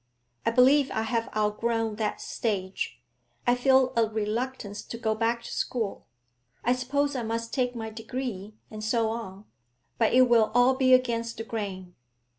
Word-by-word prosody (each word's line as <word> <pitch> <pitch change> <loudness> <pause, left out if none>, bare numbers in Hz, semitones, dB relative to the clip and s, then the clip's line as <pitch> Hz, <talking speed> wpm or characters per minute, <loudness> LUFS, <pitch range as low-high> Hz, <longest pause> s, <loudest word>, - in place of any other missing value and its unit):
I - - +6
believe 265 +4 +5
I 220 - -1
have 230 0 -1
outgrown 220 +1 0
that 215 -1 -2
stage; 195 -4 -3 0.5
I 245 - +4
feel 260 +1 +3
a 225 -2 +3
reluctance 220 0 -3
to 230 - -8
go 220 -1 0
back 230 +2 0
to - - -8
school. 225 -5 -3 0.6
I 245 - +3
suppose 280 +3 0
I 255 - -1
must 230 0 -3
take 250 -2 0
my 220 -1 -5
degree, 220 -3 -5 0.2
and 215 0 -7
so 225 0 +1
on, 205 -3 -7 0.5
but 225 - +3
it 255 +1 +6
will 235 -3 +4
all 245 +2 +6
be 260 -1 +5
against 230 -2 -1
the 225 - -4
grain.' 195 -5 -5
230 Hz, 165 wpm, -27 LUFS, 215-250 Hz, 0.6 s, I